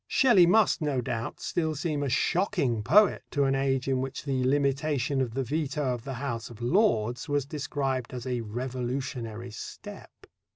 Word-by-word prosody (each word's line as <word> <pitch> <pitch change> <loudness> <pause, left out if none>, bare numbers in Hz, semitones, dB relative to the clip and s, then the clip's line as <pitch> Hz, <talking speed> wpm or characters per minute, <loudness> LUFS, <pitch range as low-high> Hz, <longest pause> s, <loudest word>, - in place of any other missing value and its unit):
Shelley 220 -10 +5
must, 210 -1 +4
no 145 -4 0
doubt, 115 -1 -4
still 160 -2 -1
seem 150 -1 -2
a 140 - -1
shocking 160 - +1
poet 200 - +4
to 145 - +1
an 135 0 +2
age 135 -1 0
in 130 -1 +1
which 135 0 -5
the 135 -3 -1
limitation 140 0 +1
of 120 -3 -2
the 135 - 0
veto 145 0 -1
of 120 -2 -7
the 135 -2 -4
House 120 -3 -4
of 115 -2 -12
Lords 120 - +1
was 145 -2 +1
described 135 -3 -3
as 125 -2 -6
a 125 -2 -1
revolutionary 120 0 -4
step. 105 - -10
135 Hz, 170 wpm, -28 LUFS, 125-150 Hz, -, Shelley